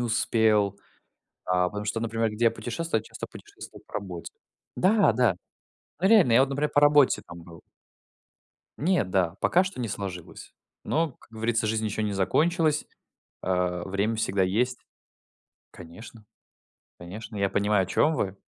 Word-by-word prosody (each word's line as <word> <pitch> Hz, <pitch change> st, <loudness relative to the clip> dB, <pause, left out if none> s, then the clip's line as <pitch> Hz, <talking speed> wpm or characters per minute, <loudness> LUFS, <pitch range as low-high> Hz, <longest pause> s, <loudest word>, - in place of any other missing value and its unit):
успел, 110 Hz, -3 st, +1 dB, 0.7 s
а, 90 Hz, 0 st, +1 dB
потому 105 Hz, +2 st, -6 dB
что, 110 Hz, +2 st, -2 dB
например, 115 Hz, 0 st, -1 dB
где 105 Hz, +3 st, -2 dB
я -, -, +5 dB
путешествую, 120 Hz, +4 st, -3 dB
я -, -, -18 dB
часто -, -, -8 dB
путешествовал -, -, -12 dB
по -, -, -23 dB
работе. 95 Hz, -4 st, -6 dB, 0.4 s
Да, 195 Hz, -, +4 dB
да. 115 Hz, -5 st, +2 dB, 0.6 s
Ну, 190 Hz, -, +3 dB
реально, 200 Hz, -, +5 dB
я 115 Hz, -, +6 dB
вот, 135 Hz, -, +3 dB
например, 145 Hz, +2 st, -1 dB
по 145 Hz, -, +3 dB
работе 145 Hz, -2 st, +5 dB
там 85 Hz, 0 st, -11 dB
был. 85 Hz, -1 st, -13 dB, 1.2 s
Не, 175 Hz, -, +2 dB
да. 95 Hz, -2 st, 0 dB
Пока 180 Hz, +2 st, +3 dB
что 185 Hz, -8 st, -6 dB
не 120 Hz, -, -2 dB
сложилось. 95 Hz, -4 st, -7 dB, 0.3 s
Но, 160 Hz, -3 st, 0 dB
как -, -, -23 dB
говорится, 115 Hz, 0 st, -1 dB
жизнь 110 Hz, 0 st, -1 dB
еще 110 Hz, +1 st, -2 dB
не 105 Hz, -1 st, -1 dB
закончилась. 155 Hz, -, +1 dB, 0.6 s
Э, 90 Hz, -1 st, -1 dB
время 100 Hz, +4 st, -1 dB
всегда 100 Hz, -3 st, 0 dB
есть. 120 Hz, +7 st, 0 dB, 0.9 s
Конечно. 105 Hz, +6 st, -13 dB, 0.7 s
Конечно. 105 Hz, +5 st, -9 dB
Я 100 Hz, -1 st, +1 dB
понимаю, 100 Hz, -1 st, +2 dB
о -, -, -3 dB
чем 155 Hz, -, +2 dB
вы. 95 Hz, -8 st, -2 dB
110 Hz, 155 wpm, -26 LUFS, 95-130 Hz, 1.2 s, я